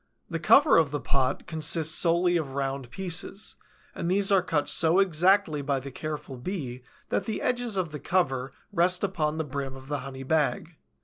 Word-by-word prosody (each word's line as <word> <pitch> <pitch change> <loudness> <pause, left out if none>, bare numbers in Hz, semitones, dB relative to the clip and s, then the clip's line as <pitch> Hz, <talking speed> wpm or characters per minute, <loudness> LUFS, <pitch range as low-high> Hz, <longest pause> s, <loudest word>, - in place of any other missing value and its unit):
The - - -2
cover 290 +1 +6
of 160 -3 +4
the 145 +1 -3
pot 135 -1 -1
consists 160 0 +1
solely 175 +1 +3
of 145 -5 -2
round 135 -2 -3
pieces, 190 - -4 0.4
and 170 - -3
these 195 +2 +2
are 195 -2 +5
cut 160 -5 -1
so 160 +3 +4
exactly 185 -3 +3
by 140 -1 -1
the 135 +1 -8
careful 150 -2 -6
Bee 130 -4 -5 0.3
that - - -1
the 220 - -3
edges 245 -4 -1
of 175 -4 -1
the 150 - -6
cover 135 -8 0 0.2
rest 180 +1 +3
upon 160 -6 -1
the 160 - -1
brim 140 -2 -5
of 135 +1 -12
the 145 -1 -1
honey 135 0 -8
bag. 160 +4 0
160 Hz, 185 wpm, -27 LUFS, 140-185 Hz, 0.4 s, cover